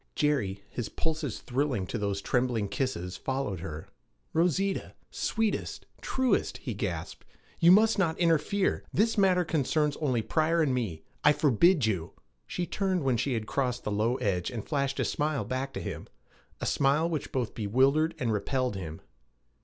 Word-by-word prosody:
Jerry, 105 -10 0
his 120 -4 -5
pulses 155 -7 -3
thrilling 130 -6 -1
to 115 - -4
those 100 -1 -2
trembling 120 -5 0
kisses, 95 -6 -2
followed 130 -9 -2
her. 80 -3 -7 0.5
'Rosita! 180 +4 +1 0.2
Sweetest 225 -2 -1 0.2
truest' 260 -1 0
he - - -5
gasped, - - -4 0.4
'you 170 0 +7
must 215 +2 +5
not 165 -4 +1
interfere! 170 +3 +1
This 225 +2 +2
matter 185 -3 +3
concerns 150 -1 +1
only 130 -7 0
Pryor 160 +5 +2
and 135 -4 +1
me. 100 -11 -2 0.2
I 150 - +7
forbid 150 - +4
you!' 90 -7 -2 0.3
She 180 - -2
turned 185 -1 -1
when 130 -3 +2
she 125 +2 0
had 110 -1 -2
crossed 125 0 -1
the 105 - -2
low 110 +4 +1
ledge, 90 -7 -1
and 115 -5 -6
flashed 140 -2 -1
a - - +1
smile 150 -6 -1
back 130 +4 -3
to - - -4
him - - -6 0.5
a - - -3
smile 145 +4 +2
which 160 -4 -3
both 125 -4 -2
bewildered 135 +9 +2
and 115 -3 0
repelled 125 +2 -1
him. 80 -4 -6
135 Hz, 160 wpm, -29 LUFS, 110-160 Hz, 0.5 s, you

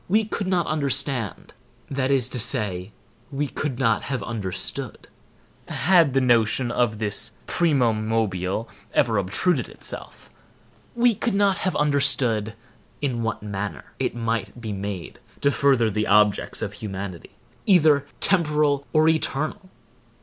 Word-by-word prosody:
We 215 +3 +3
could 205 -2 -3
not 180 -3 +1
understand, 140 - -1 0.4
that 135 -1 0
is 135 -3 +3
to 125 - -1
say, 105 -4 -1 0.4
we 145 +1 -1
could 140 -1 -3
not 115 -5 +2
have 130 -6 -3
understood, 100 -6 -4 0.6
had 170 -6 +3
the - - +5
notion 120 0 +3
of 120 -4 +1
this 105 -2 -1
primum 125 -10 +1
mobile 105 -1 -1 0.3
ever 110 -3 +3
obtruded 125 - 0
itself;—we 240 0 -4
could 220 +1 -1
not 200 -1 +3
have 185 - -1
understood 130 -7 +1 0.4
in 130 -5 -1
what 115 -2 -3
manner 100 -1 -5
it - - -1
might 115 0 -2
be 110 -2 -5
made 100 -2 -6 0.2
to 140 - +3
further 130 -6 +3
the 105 +2 -1
objects 105 0 +3
of - - -4
humanity, 95 -4 -7 0.3
either 155 -7 +5
temporal 150 -6 +2
or 155 0 +4
eternal. 160 +4 -1
125 Hz, 130 wpm, -24 LUFS, 110-150 Hz, 0.6 s, the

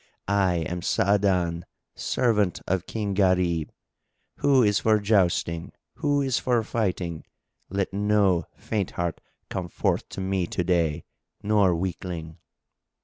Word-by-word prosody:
I 95 -4 +2
am 90 +1 -4
Sa'adan, 90 -4 +1 0.3
servant 105 -7 +1
of 95 -1 -1
King 105 -3 -2
Gharib. 90 -4 +2 0.7
Who 135 -3 +4
is 105 -2 +3
for 110 -1 +3
jousting? 90 -5 +1 0.2
Who 145 -2 +1
is 130 -3 +1
for 120 -3 +1
fighting? 90 -8 -2 0.5
Let 100 0 -2
no 100 -3 +2
faint 105 -4 -2
heart 85 -2 -2 0.3
come 90 -2 -3
forth - - -1
to - - -7
me 95 -2 -1
to 90 - -2
day 85 -3 +1 0.4
or 100 -4 +4
weakling." 85 -2 -4
95 Hz, 125 wpm, -26 LUFS, 85-105 Hz, 0.7 s, Who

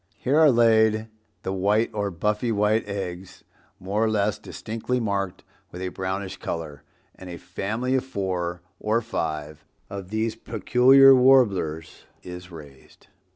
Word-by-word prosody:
Here 140 +5 +1
are 155 -2 +7
laid 110 -2 +3 0.3
the 95 - -3
white 105 +4 +1
or 100 -1 -1
buffy 105 +6 -1
white 105 +1 +1
eggs, 95 -2 -6 0.4
more 100 +4 -1
or 110 - +2
less 105 -1 0
distinctly 115 +3 -4
marked 100 -5 -3 0.3
with 90 - -9
a 95 - -2
brownish 95 +1 -4
color, 80 -4 -6 0.3
and 95 - -12
a 85 - -7
family 105 +9 -3
of 130 - +1
four 90 -7 -3 0.2
or 110 +2 0
five 75 -7 -4 0.3
of 100 -2 -7
these 110 +1 -2
peculiar 125 +5 +5
Warblers 105 -12 +2 0.2
is 90 0 -9
raised. 75 -6 -15
100 Hz, 140 wpm, -24 LUFS, 90-115 Hz, 0.4 s, are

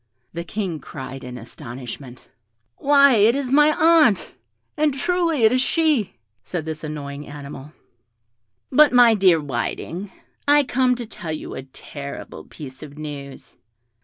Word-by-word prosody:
The 170 0 -4
King 175 -2 -4
cried 135 -2 -8
in 125 0 -7
astonishment, 125 +1 -9 0.5
"Why, 280 -3 +5
it 215 +4 +5
is 275 -2 -2
my 295 +2 +6
aunt!" 310 - +4 0.4
"And 300 -3 +1
truly 335 -2 0
it 220 - +6
is 255 0 +2
she," 285 - +1 0.3
said 175 -4 -4
this 160 -1 -6
annoying 145 -1 -6
animal. 145 0 -9 1.0
"But, 295 +3 +6
my 245 -2 +6
dear 190 -5 +4
Whiting, 160 +7 -4 0.4
I 290 0 +6
come 255 -1 +1
to 240 -1 -6
tell 170 -6 -7
you 155 - -6
a - - -5
terrible 140 +1 -9
piece 130 -3 -11
of 150 -1 -11
news." 145 -3 -9
175 Hz, 140 wpm, -22 LUFS, -, 1.0 s, my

